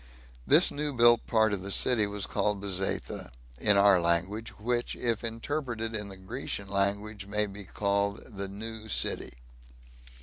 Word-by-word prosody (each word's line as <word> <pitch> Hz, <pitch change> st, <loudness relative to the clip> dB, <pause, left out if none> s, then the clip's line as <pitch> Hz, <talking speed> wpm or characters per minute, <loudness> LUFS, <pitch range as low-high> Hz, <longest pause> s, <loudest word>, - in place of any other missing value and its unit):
This -, -, +7 dB
new 150 Hz, 0 st, -2 dB
built 120 Hz, -1 st, +4 dB
part 110 Hz, -2 st, +3 dB
of 100 Hz, -, -3 dB
the 100 Hz, -, -6 dB
city 110 Hz, +1 st, +3 dB
was 100 Hz, 0 st, -3 dB
called 105 Hz, -1 st, -1 dB
"Bezetha," 95 Hz, -7 st, -3 dB, 0.3 s
in 105 Hz, -1 st, +4 dB
our 100 Hz, -2 st, +5 dB
language, 90 Hz, +7 st, 0 dB
which, 120 Hz, +2 st, -2 dB
if 115 Hz, -2 st, -1 dB
interpreted 115 Hz, -1 st, -3 dB
in 105 Hz, -1 st, -2 dB
the 95 Hz, -1 st, -10 dB
Grecian 100 Hz, 0 st, -6 dB
language, 100 Hz, +1 st, -1 dB
may 105 Hz, +1 st, +1 dB
be 100 Hz, 0 st, -9 dB
called 100 Hz, +1 st, -1 dB
"the 100 Hz, -2 st, -7 dB
New 110 Hz, +2 st, -8 dB
City." 105 Hz, -, 0 dB
105 Hz, 155 wpm, -29 LUFS, 100-115 Hz, 0.3 s, This